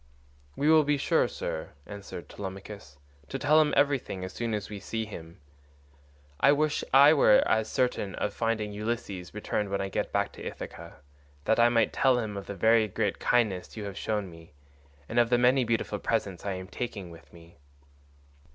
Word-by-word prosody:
"We 145 - 0
will 155 0 +6
be 145 0 +1
sure, - - +2
sir," 80 - -5
answered 100 -4 -9
Telemachus, 95 -6 -9 0.3
"to 135 - -3
tell 150 +4 +4
him 150 - +2
everything 135 -10 +1
as 95 - -8
soon 115 -2 -2
as 105 -1 -4
we 105 -1 -7
see 110 +2 -4
him. 85 -5 -10 1.0
I 140 - +6
wish 150 0 0
I 140 +3 +8
were 135 -8 +5
as 110 0 +1
certain 125 -7 -1
of 105 - -2
finding 110 -2 -1
Ulysses 105 -4 -4
returned 105 -1 -2
when 100 - -1
I 95 - -2
get - - -2
back - - 0
to - - -11
Ithaca, - - -8 0.4
that 110 - +2
I 120 0 +6
might 115 -2 +2
tell 130 -2 +3
him 110 -4 -3
of 100 - -7
the 100 - -5
very 110 +3 +4
great 95 - -2
kindness 110 -6 0
you 105 - -4
have 100 -1 -6
shown 105 -1 -2
me 85 -2 -15 0.5
and 120 - 0
of 120 -1 +3
the 120 - +4
many 125 +2 +4
beautiful 115 -3 -1
presents 100 -5 -2
I 100 - -1
am 95 0 -7
taking 100 -5 -6
with 80 0 -15
me." 85 -2 -17
110 Hz, 190 wpm, -28 LUFS, 95-120 Hz, 1.0 s, I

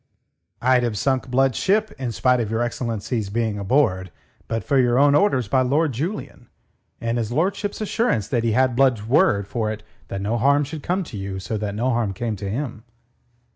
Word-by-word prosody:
"I'd 130 0 +4
have 120 -3 -1
sunk 130 +6 0
Blood's 130 0 +2
ship 210 +3 +1
in 125 -3 -2
spite 125 +2 +2
of 115 -3 -2
your 115 +2 0
excellency's 115 -2 -3
being 110 -1 -1
aboard 100 - +1 0.4
but 115 -2 -2
for 135 +7 +2
your 120 -1 +3
own 140 +1 +5
orders 145 - +2
by 130 +5 +2
Lord 145 +4 +2
Julian, 165 - -5 0.5
and 115 +1 -1
his 115 -1 -3
lordship's 195 - -1
assurance 215 - 0
that 120 -3 0
he 115 -2 +1
had 130 +1 +2
Blood's 125 -5 +2
word 105 -5 +3
for 110 -1 -2
it 110 0 -7 0.2
that 100 - -4
no 110 +4 -1
harm 140 +4 +4
should 150 +2 -6
come 185 +5 -1
to 125 -10 -8
you 95 -1 -5
so 100 +4 -4
that 105 -1 -3
no 125 +4 0
harm 115 -4 0
came 110 +3 -3
to 100 +1 -5
him. 115 -1 -4
120 Hz, 200 wpm, -22 LUFS, 110-135 Hz, 0.5 s, own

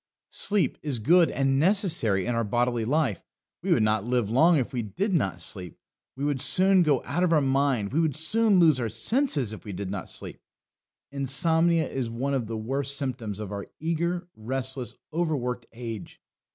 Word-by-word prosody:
Sleep 205 -3 +2
is 145 -5 -2
good 165 +9 +4
and 135 0 +1
necessary 160 - +2
in 120 - -1
our 115 0 0
bodily 120 +1 0
life. 135 - 0 0.4
We - - -2
would - - +4
not 110 -1 +1
live 120 -2 0
long 160 +7 +5
if 130 0 -2
we 125 - -1
did 115 - -2
not 95 - 0
sleep; 90 -4 -3 0.4
we 140 +2 -3
would 145 -3 -1
soon 190 0 +4
go 150 -6 +2
out 155 +7 -2
of 180 - +2
our 160 - +5
mind; 135 -6 +1
we 155 - +2
would 160 -4 +1
soon 215 +6 +2
lose 155 -6 +5
our 115 -2 -1
senses 160 - 0
if 110 - -9
we 100 - -7
did 95 +1 -5
not 100 -3 -5
sleep. - - -8 0.7
Insomnia 160 +4 +2
is 130 -4 -3
one 130 +5 -2
of 125 -5 -1
the 115 0 -4
worst 135 +5 -2
symptoms 120 -7 -4
of 105 -2 -6
our 100 -1 -5
eager, 170 +2 -2
restless, 130 +3 -4 0.2
over 160 -1 0
worked 125 -2 -4
age. 115 -3 -8
135 Hz, 190 wpm, -26 LUFS, 115-160 Hz, 0.7 s, long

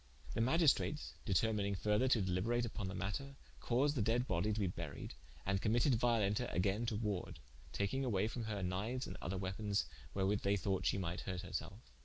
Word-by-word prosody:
The - - 0
Magistrates 150 +2 +3
determining 100 -1 +2
further 105 +6 +2
to 120 -6 +4
deliberate 100 +7 +1
vpon 105 -4 -4
the 95 - -4
matter, 135 +8 -3 0.2
caused 135 +4 +2
the 125 - +1
dead 115 +4 +2
bodie 95 0 +1
to 105 - -1
be 100 - +2
buried, 85 -5 -5 0.3
and 95 0 +1
committed 120 +5 +3
Violenta 115 -1 +2
againe 100 +6 +1
to 115 - 0
warde, 105 -4 -2 0.3
taking 100 +7 0
away 105 -5 +1
from 115 0 -4
her 105 -3 -3
kniues 105 +8 -1
and - - -6
other 95 +3 -2
weapons, 100 -1 -1 0.3
wherewith 100 +1 +1
they 100 +1 +2
thought 95 -1 0
shee - - +2
might 90 -2 -2
hurt 90 -2 -4
her 90 - -9
selfe. 95 - -5
105 Hz, 190 wpm, -37 LUFS, 95-120 Hz, 0.3 s, to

